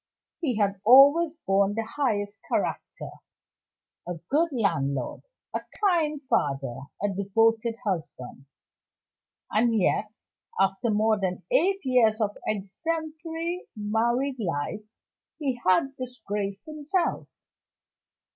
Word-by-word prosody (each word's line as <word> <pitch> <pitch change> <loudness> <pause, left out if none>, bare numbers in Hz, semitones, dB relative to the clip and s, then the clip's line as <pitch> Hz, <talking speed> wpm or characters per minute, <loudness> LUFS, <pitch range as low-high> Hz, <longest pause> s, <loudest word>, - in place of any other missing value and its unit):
He 265 -10 -1
had 200 -2 0
always 285 +7 +7
borne 195 +1 +2
the 225 - -1
highest 210 -5 -2
character - - -2 1.0
a 175 - -3 0.2
good 325 +4 +3
landlord, 140 - -1 0.3
a - - -1 0.2
kind 330 -7 +2
father, 140 - -1 0.2
a 205 - +2
devoted 225 +4 +1
husband. 145 -8 -4 1.0
And 225 +2 +3
yet, 210 +2 +1 0.5
after 195 +5 +2
more 215 0 +2
than 185 -2 -2
eight 390 -5 +3
years 235 -4 +3
of 210 -2 0
exemplary 325 - -3
married 235 +5 0
life, 175 +1 -2 0.6
he 265 -6 -2
had 270 +10 +3
disgraced 210 -4 -4
himself. 310 +3 -2
225 Hz, 100 wpm, -26 LUFS, 200-285 Hz, 1.0 s, always